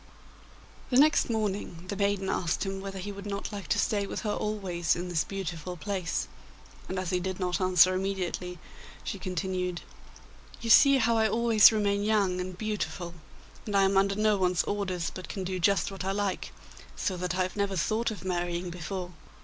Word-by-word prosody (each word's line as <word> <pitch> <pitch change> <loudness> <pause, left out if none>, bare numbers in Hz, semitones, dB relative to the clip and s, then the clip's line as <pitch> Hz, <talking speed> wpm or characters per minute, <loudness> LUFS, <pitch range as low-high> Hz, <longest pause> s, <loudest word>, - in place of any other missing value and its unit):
The 250 - +3
next 300 -1 +5
morning 205 -6 -2
the 200 - -2
maiden 200 -1 0
asked 175 +1 0
him 195 0 -4
whether 195 0 -6
he 195 +2 -5
would 200 0 -8
not 200 0 -4
like 200 -5 -6
to 145 - +1
stay 200 -2 +1
with - - -4
her 210 -3 -1
always 185 -6 -1
in 180 +1 -4
this 165 -3 +1
beautiful 180 -2 -5
place, 180 -2 -2 0.6
and 190 - -3
as 185 -1 -2
he 180 - +1
did 185 +1 -4
not 180 +1 -1
answer 185 0 +5
immediately, 185 -2 -2 0.5
she - - -4
continued: 185 -1 -2 0.8
'You 230 -1 -1
see 275 +4 +8
how 230 -2 +2
I 220 0 +3
always 225 -4 +6
remain 205 -2 +1
young 200 -4 +2
and 180 0 -6
beautiful, 180 -5 -3 0.5
and 205 -1 +1
I 195 - +5
am 195 0 +2
under 195 +1 +3
no 210 0 +3
one's 180 -1 +2
orders, 190 -4 -2
but 185 - -8
can 195 - -4
do 185 0 -3
just 190 0 +2
what 195 -1 -6
I 190 +1 -1
like, 200 -1 -2 0.4
so 190 - -1
that 180 +1 -2
I 185 - +2
have 185 - -4
never 200 -1 0
thought 220 +7 0
of 210 -3 -7
marrying 175 -1 -2
before. 180 +1 -5
190 Hz, 190 wpm, -29 LUFS, 180-205 Hz, 0.8 s, see